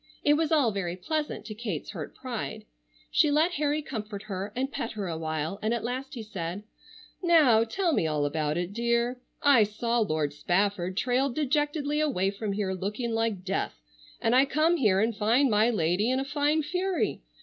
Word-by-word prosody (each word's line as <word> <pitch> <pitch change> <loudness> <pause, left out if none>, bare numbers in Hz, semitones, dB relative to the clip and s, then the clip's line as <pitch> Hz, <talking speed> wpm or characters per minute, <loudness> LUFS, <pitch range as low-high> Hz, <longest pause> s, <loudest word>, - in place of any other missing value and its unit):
It 295 - +5
was 315 +1 +1
all 285 -8 +4
very 180 -4 -3
pleasant 305 - -3
to 215 - -6
Kate's 210 -8 -4
hurt - - -7
pride. - - -5 0.5
She 305 - +4
let 310 +4 +3
Harry 300 -1 0
comfort 215 -6 -6
her, 195 0 -5
and 265 +3 -1
pet 255 -5 -4
her 205 -3 -4
a 165 - -3
while, 160 +3 -3
and 220 +2 +1
at 235 - -4
last 260 +3 -4
he 230 - -5
said: 190 -2 -5 0.6
"Now 305 -11 +5
tell 335 - 0
me 165 - +2
all 150 -2 0
about 150 +1 -1
it, 175 +2 -3
dear. 235 +2 0 0.2
I 280 -5 +6
saw 230 +3 -1
Lord 155 -8 0
Spafford 185 +3 0
trail 255 +4 +2
dejectedly 295 +2 0
away 220 -11 +1
from 200 0 -3
here 195 -2 -1
looking 210 +6 -3
like 225 -4 -1
death, 195 - -2 0.4
and 230 +2 +2
I 265 +2 +6
come 315 +5 +2
here 205 - +3
and 225 +2 +1
find 235 +5 +3
my 215 +2 +4
lady 200 +1 +1
in 260 +1 +1
a 270 - -2
fine 295 +2 +1
fury. 365 +4 -1
230 Hz, 190 wpm, -28 LUFS, 195-285 Hz, 0.6 s, I